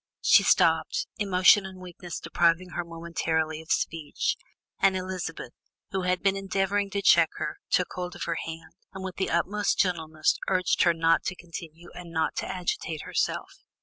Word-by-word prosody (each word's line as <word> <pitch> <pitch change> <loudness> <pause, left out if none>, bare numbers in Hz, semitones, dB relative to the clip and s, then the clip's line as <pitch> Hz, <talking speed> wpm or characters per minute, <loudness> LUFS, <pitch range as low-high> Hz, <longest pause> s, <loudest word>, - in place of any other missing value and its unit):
She - - +7
stopped, - - +3
emotion 195 0 +5
and 190 -1 -9
weakness 175 -1 -8
depriving 170 +2 +1
her 175 - -3
momentarily 165 -2 -2
of 160 - -17
speech, 155 -3 -1 0.4
and 190 -1 +4
Elizabeth, 185 -8 -5 0.4
who 190 - -1
had 180 0 0
been 195 -1 +3
endeavouring 195 +1 0
to 200 0 -3
check 170 -3 +6
her, - - -4
took 180 - +1
hold 180 -1 -5
of - - -5
her 170 -1 -2
hand, 165 0 -8 0.2
and 190 0 -7
with 190 -1 -6
the 190 - -1
utmost 205 +4 +1
gentleness 160 -4 +1
begged 185 -2 +2
her 170 -1 +4
not 165 0 +3
to 185 - -2
continue 170 -1 -10
and 175 -1 -9
not 160 -1 0
to - - -2
agitate 170 -3 -3
herself. - - -2
180 Hz, 170 wpm, -27 LUFS, 165-190 Hz, 0.4 s, She